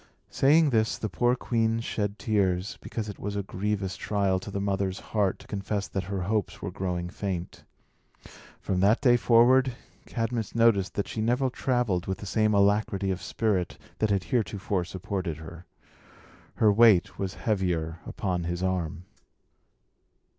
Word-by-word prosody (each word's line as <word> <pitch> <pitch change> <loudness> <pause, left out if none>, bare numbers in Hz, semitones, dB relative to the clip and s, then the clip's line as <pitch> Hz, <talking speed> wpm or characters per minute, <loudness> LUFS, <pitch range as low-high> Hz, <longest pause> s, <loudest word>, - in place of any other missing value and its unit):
Saying 150 +2 +4
this, 110 -2 +1
the 110 - -3
poor 120 +5 +2
queen 115 -2 0
shed 105 -2 -2
tears, 100 -2 0
because 110 -2 -5
it 100 - -7
was 100 0 -4
a 100 - -1
grievous 95 0 -2
trial 100 -3 0
to 95 - -9
the 100 - -3
mother's 100 -1 -1
heart 100 -4 +2
to - - -15
confess 100 0 -3
that 95 -2 -3
her 95 -1 -3
hopes 105 0 -1
were - - -5
growing 90 -2 -3
faint. 90 -1 -5 1.0
From 95 - -1
that 100 +5 +4
day 125 -4 +5
forward, 120 +2 +4 0.3
Cadmus 115 -2 -3
noticed 115 -5 +3
that 100 - -1
she 110 - -4
never 125 +4 +1
travelled 120 -9 0
with 95 - -2
the - - -9
same 110 +2 +2
alacrity 100 -1 +2
of 95 - -3
spirit 100 -6 -1 0.2
that 110 - +2
had 100 -2 +1
heretofore 100 -4 -1
supported 95 -2 -4
her. 80 +2 -11 0.9
Her 110 -2 +4
weight 105 -4 +5
was 95 -1 -3
heavier 85 -6 -1
upon 90 -4 -2
his 85 +1 -3
arm. 90 -3 -2
100 Hz, 155 wpm, -27 LUFS, 95-110 Hz, 1.0 s, day